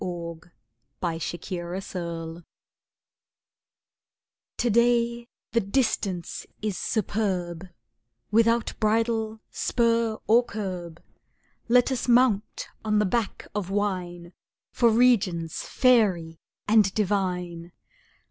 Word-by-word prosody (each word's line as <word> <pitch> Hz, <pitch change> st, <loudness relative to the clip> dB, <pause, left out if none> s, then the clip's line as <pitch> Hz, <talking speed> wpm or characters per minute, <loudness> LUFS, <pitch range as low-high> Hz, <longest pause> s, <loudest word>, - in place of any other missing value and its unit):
The -, -, -3 dB, 0.9 s
Wine 165 Hz, -2 st, -2 dB
of 175 Hz, +4 st, -6 dB
Lovers 170 Hz, -2 st, -5 dB, 2.1 s
To 240 Hz, -, +1 dB
day 235 Hz, +1 st, +2 dB, 0.2 s
the 235 Hz, -, +3 dB
Distance 200 Hz, -5 st, -1 dB
is 215 Hz, -3 st, -2 dB
superb, 185 Hz, -5 st, -2 dB, 0.6 s
Without 230 Hz, +1 st, +3 dB
bridle, 220 Hz, 0 st, 0 dB
spur 230 Hz, -2 st, +1 dB
or 235 Hz, +3 st, +5 dB
curb, 185 Hz, -7 st, -6 dB, 0.6 s
Let 245 Hz, +2 st, +4 dB
us 255 Hz, -2 st, -2 dB
mount 240 Hz, -4 st, +2 dB, 0.2 s
on 215 Hz, -1 st, +1 dB
the 210 Hz, -, +3 dB
back 220 Hz, +2 st, -2 dB
of 200 Hz, -3 st, -3 dB
wine 180 Hz, -4 st, -2 dB, 0.4 s
For 235 Hz, -2 st, +3 dB
Regions 205 Hz, -9 st, +2 dB
fairy 195 Hz, -11 st, +2 dB, 0.3 s
and 210 Hz, -2 st, +5 dB
divine! 180 Hz, -4 st, -1 dB
210 Hz, 90 wpm, -26 LUFS, 175-230 Hz, 2.1 s, or